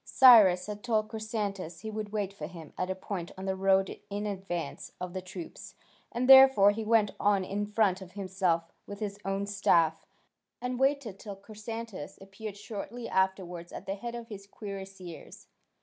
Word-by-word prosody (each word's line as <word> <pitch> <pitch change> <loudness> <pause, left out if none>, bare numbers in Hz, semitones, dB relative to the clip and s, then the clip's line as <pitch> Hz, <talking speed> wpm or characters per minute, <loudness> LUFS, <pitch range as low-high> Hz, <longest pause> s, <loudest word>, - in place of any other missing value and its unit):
Cyrus 210 -9 +7
had 210 0 -7
told 215 -3 +1
Chrysantas 205 -6 -4
he 220 - -5
would 215 -1 -5
wait 205 -2 -2
for 155 -6 -6
him 165 -3 -11
at 185 - -2
a 190 - -1
point 190 -2 -5
on 190 - -6
the 190 0 -1
road 195 0 +2
in 205 +1 -3
advance 185 -6 -4
of 180 -1 -5
the 185 - -3
troops, 180 -2 -9 0.4
and 245 +2 -1
therefore 265 -7 +9
he 220 +2 -4
went 215 -2 +3
on 200 -2 +3
in 205 +2 -2
front 210 -3 +2
himself 185 -3 -1 0.2
with 200 0 -7
his 205 -2 -4
own 195 +1 -1
staff, 170 -5 +2 0.5
and 250 0 -3
waited 265 -7 +1
till 205 -2 -7
Chrysantas 215 -3 -7
appeared 195 +2 -8
shortly 220 +3 -6
afterwards 185 -2 -1
at - - -8
the 195 - -2
head 235 +4 -6
of 235 -1 -8
his 200 -2 -9
cuirassiers. 195 -4 -9
200 Hz, 170 wpm, -30 LUFS, 190-215 Hz, 0.5 s, therefore